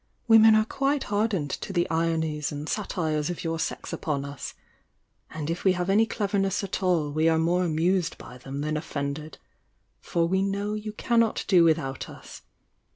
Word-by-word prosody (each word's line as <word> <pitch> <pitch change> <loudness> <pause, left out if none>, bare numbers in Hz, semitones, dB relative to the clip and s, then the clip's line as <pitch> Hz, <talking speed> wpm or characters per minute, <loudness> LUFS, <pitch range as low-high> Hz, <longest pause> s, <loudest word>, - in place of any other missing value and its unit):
"Women 225 -1 +8
are 215 0 +4
quite 275 +4 0
hardened 205 -8 -1
to - - -5
the 175 -2 +1
ironies 160 -2 0
and 145 +1 -5
satires 160 -7 -1
of 175 - -4
your 165 -1 -2
sex - - -4
upon 140 -3 -2
us,— 140 -1 -7 0.7
and 155 -2 -5
If 165 +2 -3
we 190 - +4
have 180 +1 -1
any 220 +3 +4
cleverness 200 -2 0
at 195 0 -3
all 170 -6 +1
we 155 +2 +2
are 160 - +3
more 170 +3 +2
amused 175 +2 +1
by 125 +1 -11
them 135 +3 -6
than 155 +1 -1
offended. 150 0 -4 0.6
For 170 -1 0
we 190 +2 +1
know 200 +1 -1
you 215 0 -5
cannot 230 0 +1
do 180 -4 +6
without 155 -5 0
us! - - -11
170 Hz, 175 wpm, -26 LUFS, 155-200 Hz, 0.7 s, Women